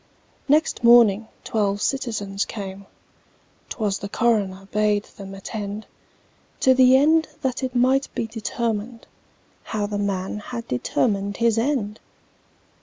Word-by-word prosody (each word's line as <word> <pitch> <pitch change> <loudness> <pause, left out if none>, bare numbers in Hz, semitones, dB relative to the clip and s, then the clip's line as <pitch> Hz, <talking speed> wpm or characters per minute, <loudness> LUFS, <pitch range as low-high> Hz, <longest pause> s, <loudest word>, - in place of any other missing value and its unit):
Next 300 -2 +2
morning 230 -3 +6 0.2
twelve 205 -2 0
citizens 205 -7 -2
came 195 -2 -7 0.8
('Twas 205 -3 -2
the 200 - -6
coroner 200 -5 0
bade 210 -1 +2
them 195 -2 -11
attend), 205 +1 -6 0.8
To 260 - +6
the 255 0 +6
end 315 +3 +4
that 260 -3 -1
it 255 -1 -3
might 260 +3 +3
be - - -1
determined 225 0 -3 0.6
How 210 -2 -3
the 205 0 -3
man 200 0 -2
had 235 +2 -7
determined 200 - -1
his 230 -1 +2
end! 225 -5 -1
215 Hz, 120 wpm, -23 LUFS, 200-245 Hz, 0.8 s, morning